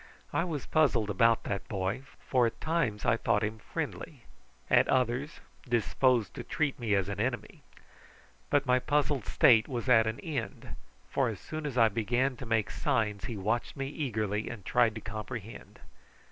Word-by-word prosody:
I - - +1
was 155 -6 -4
puzzled 125 -9 +2
about 115 +3 +3
that 100 -1 -4
boy, 95 +4 -2 0.3
for 125 -3 +3
at 115 - -6
times 155 -11 -1
I 115 - +3
thought 115 -2 +1
him 110 +1 -2
friendly, - - -6 0.4
at - - +4
others 130 +4 0 0.3
disposed 120 0 +2
to - - -6
treat 150 -4 -1
me 110 -4 +1
as 100 -1 +1
an 100 0 -4
enemy; 115 -2 -3 0.9
but 145 0 +2
my 125 0 +3
puzzled 145 -3 0
state 110 -4 +5
was 120 -2 -4
at 115 -3 +5
an 110 +1 -3
end, 155 -4 -5 0.4
for 135 -3 +1
as 110 - -6
soon 155 -1 -5
as 130 -3 -5
I 115 -2 +6
began 120 +5 0
to 125 - -8
make 110 -3 +1
signs 105 -4 -1
he 115 - -4
watched 110 +5 -1
me 135 0 -3
eagerly 110 -8 -2
and 110 -6 -8
tried 120 -3 +3
to 110 - -6
comprehend. 110 +1 -7
115 Hz, 175 wpm, -30 LUFS, 105-130 Hz, 0.9 s, I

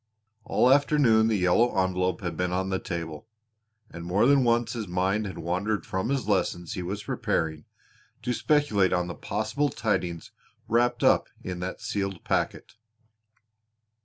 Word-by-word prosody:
All - - +2
the 130 - +7
afternoon 140 -6 +4
the 110 -2 +2
yellow 95 +6 +2
envelope 90 -1 0
had 85 -3 -4
been 90 0 -1
on 95 +1 -1
the 95 - 0
table, 85 0 -6 0.6
and 85 0 -8
more 90 +6 +2
than 140 0 +5
once 115 -1 +1
his 115 -4 -4
mind 95 +4 0
had 95 - -7
wandered 95 +6 -2
from 95 +3 -2
the 140 - +1
lessons 95 -6 -1
he 90 - -4
was 100 +4 -4
preparing 80 -2 -2 0.6
to 125 - 0
speculate 115 - +2
on 90 -1 +1
the 85 - -5
possible 110 +12 -1
tidings 90 -8 -2 0.4
wrapped 120 +1 +1
up - - +4 0.2
in 90 -1 -5
that 90 +1 -5
sealed 100 -3 -3
packet. - - -2
95 Hz, 160 wpm, -27 LUFS, 90-115 Hz, 0.6 s, the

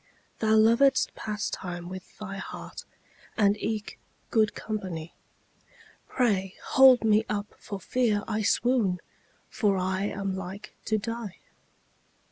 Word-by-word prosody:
Thou 220 -1 +3
lovedst 235 +5 +4
pastime 185 -5 -4
with 185 0 -9
thy 195 -2 -6
heart, - - -8 0.5
And 205 -2 +4
eke 215 0 -4 0.3
good 215 -2 +3
company; 185 -7 -5 0.9
Pray 195 -7 0
hold 260 -3 +7
me 215 0 +4
up 205 0 -3
for 200 - -6
fear 215 0 +1
I 220 -1 -1
swoon, 215 -4 +2 0.5
For 205 -4 +1
I 185 +1 0
am 195 -2 -2
like 190 +3 -7
to 220 - +1
die. 230 -2 -5
210 Hz, 115 wpm, -28 LUFS, 190-225 Hz, 0.9 s, hold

